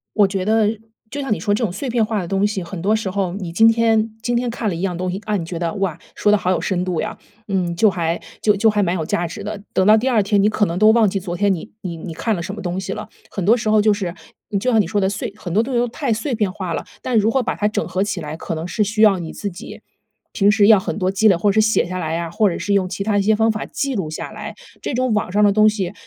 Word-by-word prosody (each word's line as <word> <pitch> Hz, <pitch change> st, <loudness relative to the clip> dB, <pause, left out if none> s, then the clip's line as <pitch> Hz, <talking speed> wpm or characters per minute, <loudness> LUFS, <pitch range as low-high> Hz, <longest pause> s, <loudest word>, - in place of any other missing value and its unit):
我 205 Hz, -2 st, +5 dB
觉 190 Hz, -1 st, -2 dB
得 220 Hz, +1 st, +2 dB, 0.3 s
就 285 Hz, -, -5 dB
像 270 Hz, -5 st, 0 dB
你 -, -, -3 dB
说 205 Hz, -, 0 dB
这 210 Hz, -, -1 dB
种 200 Hz, -, 0 dB
碎 250 Hz, +8 st, -4 dB
片 230 Hz, -2 st, +2 dB
化 215 Hz, -3 st, -2 dB
的 175 Hz, -, -6 dB
东 195 Hz, +3 st, +1 dB
西， 205 Hz, -3 st, -3 dB
很 170 Hz, 0 st, -7 dB
多 210 Hz, +4 st, +2 dB
时 215 Hz, -3 st, -2 dB
候 185 Hz, -2 st, -1 dB
你 185 Hz, -3 st, -5 dB
今 220 Hz, +6 st, +5 dB
天 225 Hz, -1 st, +2 dB
今 240 Hz, +1 st, -1 dB
天 245 Hz, +1 st, 0 dB
看 230 Hz, -2 st, -2 dB
了 180 Hz, -, -3 dB
一 -, -, -5 dB
样 180 Hz, -3 st, -2 dB
东 180 Hz, 0 st, -2 dB
西， 185 Hz, -, -3 dB
啊， 215 Hz, -, 0 dB
你 180 Hz, -, -1 dB
觉 170 Hz, 0 st, -5 dB
得， 170 Hz, -1 st, -2 dB
哇， 190 Hz, -5 st, -2 dB, 0.2 s
说 210 Hz, -, +2 dB
得 210 Hz, -, +5 dB
好 185 Hz, -, -1 dB
有 185 Hz, -, 0 dB
深 180 Hz, -2 st, -1 dB
度 180 Hz, -3 st, -1 dB
呀， -, -, -5 dB, 0.3 s
嗯， 180 Hz, -3 st, -1 dB
就 215 Hz, +4 st, +4 dB
还 170 Hz, -3 st, -2 dB, 0.2 s
就 210 Hz, -1 st, +3 dB
就 220 Hz, +3 st, +3 dB
还 210 Hz, -1 st, +1 dB
蛮 180 Hz, -1 st, +1 dB
有 160 Hz, -3 st, -2 dB
价 170 Hz, +2 st, -1 dB
值 185 Hz, +5 st, -8 dB
的。 210 Hz, 0 st, -5 dB
等 190 Hz, -, +2 dB
到 215 Hz, +2 st, +7 dB
第 235 Hz, +4 st, -1 dB
2 230 Hz, -5 st, +3 dB
天 200 Hz, 0 st, +2 dB
你 205 Hz, -, +4 dB
可 210 Hz, -1 st, +2 dB
能 170 Hz, +1 st, -3 dB
都 215 Hz, +1 st, +7 dB
忘 220 Hz, -3 st, +4 dB
记 195 Hz, -, -2 dB
昨 175 Hz, -2 st, -5 dB
天 200 Hz, +1 st, +2 dB
你 180 Hz, +5 st, -6 dB
你 175 Hz, -3 st, -5 dB
你 165 Hz, +1 st, -7 dB
看 220 Hz, +7 st, -1 dB
了 170 Hz, -, -4 dB
什 190 Hz, +4 st, -5 dB
么 210 Hz, -, -7 dB
东 180 Hz, 0 st, -3 dB
西 190 Hz, -, -4 dB
了。 -, -, -7 dB, 0.2 s
很 195 Hz, -, -4 dB
多 225 Hz, +6 st, +4 dB
时 215 Hz, -2 st, -2 dB
候 215 Hz, -1 st, +4 dB
就 210 Hz, 0 st, +4 dB
是 190 Hz, -3 st, -4 dB, 0.4 s
就 255 Hz, +4 st, 0 dB
像 225 Hz, -, +4 dB
你 175 Hz, -, -3 dB
说 205 Hz, +2 st, 0 dB
的， 190 Hz, -, +2 dB
碎 200 Hz, 0 st, -4 dB
很 180 Hz, -5 st, -6 dB
多 210 Hz, -, +4 dB
东 260 Hz, +2 st, -5 dB
西 240 Hz, -, +2 dB
都 245 Hz, -, 0 dB
太 255 Hz, 0 st, -1 dB
碎 225 Hz, +5 st, -3 dB
片 210 Hz, -4 st, 0 dB
化 185 Hz, -3 st, -4 dB
了， -, -, -4 dB, 0.2 s
但 250 Hz, -3 st, 0 dB
如 215 Hz, +1 st, +3 dB
何 255 Hz, +2 st, +1 dB
把 -, -, -2 dB
它 210 Hz, -, 0 dB
整 215 Hz, -, -2 dB
合 185 Hz, +1 st, -2 dB
起 200 Hz, -4 st, -3 dB
来， 150 Hz, +1 st, -6 dB
可 165 Hz, -, -4 dB
能 160 Hz, +1 st, -4 dB
是 215 Hz, -, -2 dB
需 215 Hz, +2 st, -1 dB
要 205 Hz, -4 st, +6 dB
你 165 Hz, -2 st, -6 dB
自 205 Hz, -, -4 dB
己 175 Hz, -, -10 dB, 0.5 s
平 200 Hz, 0 st, +3 dB
时 205 Hz, -1 st, +4 dB
要 215 Hz, -2 st, +7 dB
很 185 Hz, -, -4 dB
多 185 Hz, -2 st, 0 dB
积 195 Hz, +3 st, +3 dB
累， 195 Hz, -, +6 dB
或 200 Hz, +4 st, +2 dB
者 215 Hz, -, +2 dB
是 215 Hz, -, +4 dB
写 220 Hz, -, +2 dB
下 185 Hz, +1 st, -5 dB
来 160 Hz, -1 st, -2 dB
啊， 170 Hz, -1 st, -4 dB
或 210 Hz, +2 st, +2 dB
者 175 Hz, -, -3 dB
是 200 Hz, -, -1 dB
用 190 Hz, -2 st, +2 dB
其 185 Hz, +2 st, -4 dB
它 210 Hz, 0 st, +1 dB
一 200 Hz, -, +3 dB
些 215 Hz, +2 st, +3 dB
方 225 Hz, +1 st, +3 dB
法 215 Hz, -, -4 dB
记 275 Hz, -1 st, -3 dB
录 185 Hz, -7 st, -2 dB
下 155 Hz, -, -6 dB
来。 -, -, -7 dB, 0.3 s
这 -, -, -3 dB
种 255 Hz, -1 st, +1 dB
网 210 Hz, -3 st, 0 dB
上 210 Hz, +3 st, +2 dB
的 205 Hz, -, +5 dB
东 215 Hz, +1 st, +5 dB
西 205 Hz, -3 st, -1 dB
205 Hz, 345 characters per minute, -20 LUFS, 180-220 Hz, 0.5 s, 到